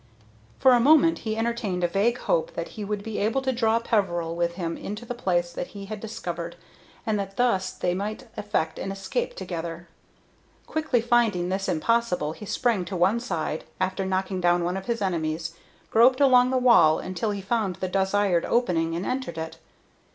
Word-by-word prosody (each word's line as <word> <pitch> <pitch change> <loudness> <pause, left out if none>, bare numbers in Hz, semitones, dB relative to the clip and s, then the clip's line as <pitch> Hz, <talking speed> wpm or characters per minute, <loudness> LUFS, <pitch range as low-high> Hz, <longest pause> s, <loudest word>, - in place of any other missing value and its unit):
For 260 - +5
a 245 - +6
moment 310 +5 +5
he 220 -1 -3
entertained 225 -6 -1
a - - +4
vague 205 +7 +1
hope - - -1
that - - -4
he 215 - -7
would 205 0 -3
be 220 -1 -4
able 225 +6 +1
to 265 - +1
draw 230 -2 +2
Peveril 175 -8 0
with 170 0 -1
him 170 -2 -3
into 210 +4 -6
the 245 - -4
place 175 -6 0
that 175 - -4
he 200 - -7
had 215 +1 -6
discovered, 175 -6 -5 0.5
and 215 -3 0
that 195 0 -5
thus 195 -7 +2
they 180 - -1
might 215 +7 -4
effect 160 -7 -2
an 195 - -3
escape - - -3
together. 170 - -6 0.8
Quickly 310 -7 0
finding 225 -7 +2
this 195 +1 -1
impossible, 180 -2 +1
he 210 +6 -9
sprang 230 -6 +1
to 190 - -5
one 190 +6 +3
side, 165 -8 -3 0.2
after 185 +1 -1
knocking 190 0 -1
down 175 0 +3
one 175 +2 -1
of 190 0 -5
his 230 -3 -1
enemies, 165 -2 -2 0.4
groped 250 +4 +5
along 255 -3 +6
the 260 - +1
wall 230 -12 +6
until 185 +4 -3
he 205 -1 -2
found 200 -2 -1
the 190 +1 -3
desired 190 -1 +1
opening, 165 -9 +1
and 175 +3 -3
entered 255 -10 -3
it. 160 0 -6
195 Hz, 190 wpm, -25 LUFS, 175-235 Hz, 0.8 s, a